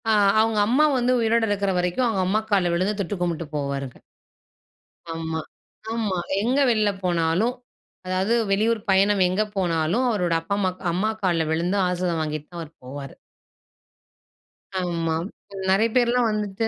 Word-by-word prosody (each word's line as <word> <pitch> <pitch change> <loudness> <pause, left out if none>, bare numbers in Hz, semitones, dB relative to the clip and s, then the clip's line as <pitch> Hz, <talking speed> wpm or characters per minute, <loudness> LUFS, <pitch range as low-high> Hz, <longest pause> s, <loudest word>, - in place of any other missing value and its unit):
ஆ. - - +4 0.3
அவங்க 220 -1 +1
அம்மா 265 +7 +4
வந்து 250 0 +2
உயிரோட 230 0 +2
இருக்கிற 200 -1 0
வரைக்கு 180 +5 -1
அவங்க 205 -5 0
அம்மா 210 +3 +2
கால்ல 185 -4 +3
விழுந்து 195 +4 0
தொட்டு 200 +2 -3
கும்பிட்டு 170 -2 -1
போவாருங்க. 140 -3 -3 1.2
ஆமா, 160 0 -3 0.5
ஆமா. 215 -5 -1 0.2
எங்க 250 +6 +1
வெளியில 215 -3 +2
போனாலு 170 +3 +1 0.6
அதாவது 185 +4 0 0.2
வெளியூர் 220 +3 +2
பயணம் 195 +1 +4
எங்க 185 +4 0 0.2
போனாலு 170 0 +1
அவரோட 180 -7 0
அப்பா, 165 +5 -4
அம்மா 190 -2 +1 0.2
அம்மா 190 +6 0
கால்ல 170 -3 +2
விழுந்து 175 +5 0
ஆஷிர்வாதம் 180 -2 -1
வாங்கிட்டு 155 -1 -4
தா 175 - -9
அவரு 160 -2 -7
போவாரு. 135 +1 -8 1.6
ஆமா. 170 -3 -1 0.5
நெறைய 205 +4 +3
பேர்லா 245 0 +3
வந்துட்டு 210 0 -2
185 Hz, 140 wpm, -24 LUFS, 165-215 Hz, 1.6 s, ஆ